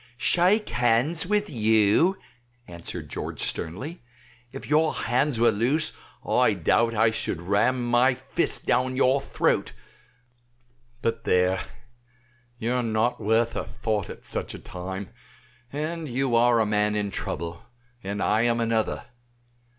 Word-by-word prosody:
"Shake 185 - +2
hands 120 +8 +1
with 210 +1 +1
you?" 110 - +3 0.5
answered 85 -2 -7
George - - -6
sternly; 130 - -4 0.5
"if 135 - -8
your 155 +1 +2
hands 125 +2 0
were 115 0 +5
loose 125 +9 +1 0.4
I - - +3
doubt 115 0 +2
I 110 +1 +4
should 110 - -2
ram 110 +8 +1
my 125 +2 +4
fist 135 +5 -2
down 130 0 +1
your 135 +1 +3
throat; - - 0 1.3
but 115 0 -1
there, 90 +1 +2 1.0
you 115 +1 -1
are 125 - +1
not 115 +1 0
worth 115 +2 +1
a - - -2
thought 110 -5 -3
at - - -10
such - - -4
a - - -6
time, 95 +2 -7 0.6
and 155 +2 -4
you 125 0 0
are 120 0 +4
a 110 - +3
man 105 0 +1
in 105 -1 -1
trouble, 85 -1 -4 0.4
and 100 +1 -3
I 110 +1 +2
am 120 0 +2
another. 115 0 0
115 Hz, 135 wpm, -25 LUFS, 105-135 Hz, 1.3 s, were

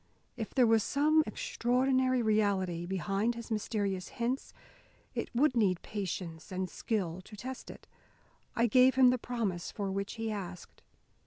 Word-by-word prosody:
If 225 -3 -6
there 255 - +6
was 225 -1 +4
some 305 +6 +3
extraordinary, 255 - +1
reality 195 -5 +1
behind 195 +5 0
his 235 0 -8
mysterious 200 -3 -1
hints, 245 +3 -2 0.6
it - - -3
would 260 +1 +3
need 195 -6 +2
patience 180 -5 -5
and 185 0 -2
skill 185 -6 -2
to 210 +3 -12
test 255 +5 -7
it. - - -11 0.7
I 230 - +3
gave 255 +3 +5
him 260 -1 +7
the 250 - 0
promise 220 -8 -2
for 200 -2 -3
which 200 +1 -3
he 225 -1 -3
asked. 185 -4 -7
220 Hz, 150 wpm, -32 LUFS, 190-250 Hz, 0.7 s, him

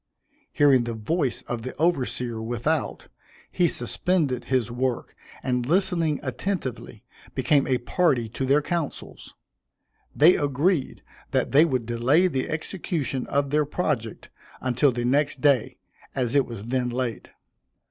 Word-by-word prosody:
Hearing 135 -4 +4
the 115 -1 -4
voice 135 +5 -1
of 120 -2 -4
the 130 +3 -6
overseer 125 -8 0
without, 120 +7 -2 0.4
he 180 -2 +2
suspended 145 -1 0
his 125 -3 0
work, 125 0 -2 0.3
and 125 -1 0
listening 165 0 +1
attentively, 135 - -4 0.3
became 145 -2 +2
a 130 -2 +2
party 125 -2 +1
to 130 +4 -3
their 145 +2 +3
councils. 170 -3 -5 0.8
They 160 +5 +6
agreed 145 +2 0 0.3
that - - 0
they 150 +4 +6
would 130 -7 -1
delay 120 +9 +2
the 135 -8 -1
execution 155 -5 -3
of 140 0 0
their 150 0 +3
project 145 -7 -3 0.3
until 130 +2 +2
the 120 0 -3
next 140 +2 +1
day, 135 -3 +2 0.4
as 125 -2 -1
it 140 -2 +3
was 115 -3 -8
then 125 +1 -1
late. 120 -2 -3
135 Hz, 135 wpm, -25 LUFS, 120-155 Hz, 0.8 s, They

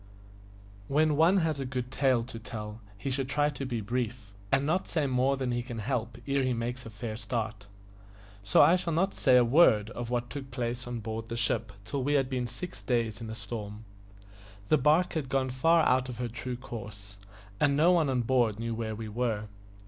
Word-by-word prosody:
WHEN 150 +1 +3
one 165 +6 +5
has 160 -5 +1
a - - -1
good 125 -1 -4
tale 130 -3 +2
to 115 -1 -8
tell, 105 0 -7 0.2
he 135 +7 -3
should 130 0 -1
try 145 +1 +2
to 135 -2 -5
be 120 -3 -2
brief, 115 -1 -3 0.2
and 135 +1 +3
not 175 +5 0
say 155 -4 0
more 130 +1 +2
than 130 -2 -1
he 120 0 0
can 120 -1 -7
help 115 0 -2
ere 140 0 +2
he 130 -1 +1
makes 120 +1 -4
a - - -7
fair 110 +1 -5
start; 110 -2 -4 0.7
so 100 -1 +5
I 175 - +6
shall 170 -2 -2
not 190 +5 +1
say 130 -2 +4
a 125 - +5
word 115 -6 +5
of 120 -1 -5
what 120 -1 -2
took 135 0 -6
place 120 -1 -3
on 120 -2 -4
board 110 +1 -5
the 115 - -3
ship 115 -2 0
till 130 +5 -2
we 145 +2 +1
had 135 -2 +2
been 125 -2 -1
six 125 +10 -6
days 115 -4 -1
in 115 - -6
a 110 - -5
storm. 110 -2 -7 0.8
The 155 - +5
barque 155 +6 +3
had 150 -5 -2
gone 130 -1 0
far 165 +6 +4
out 130 0 +2
of 120 - -6
her 125 0 -2
true 125 +2 -5
course, 105 -5 -9 0.4
and 140 -1 +3
no 165 +4 +5
one 165 -5 +3
on 125 -2 +1
board 115 -3 +2
knew 115 +1 -3
where 110 -1 -3
we 110 0 -6
were. 110 -1 -2
125 Hz, 215 wpm, -29 LUFS, 115-135 Hz, 0.8 s, I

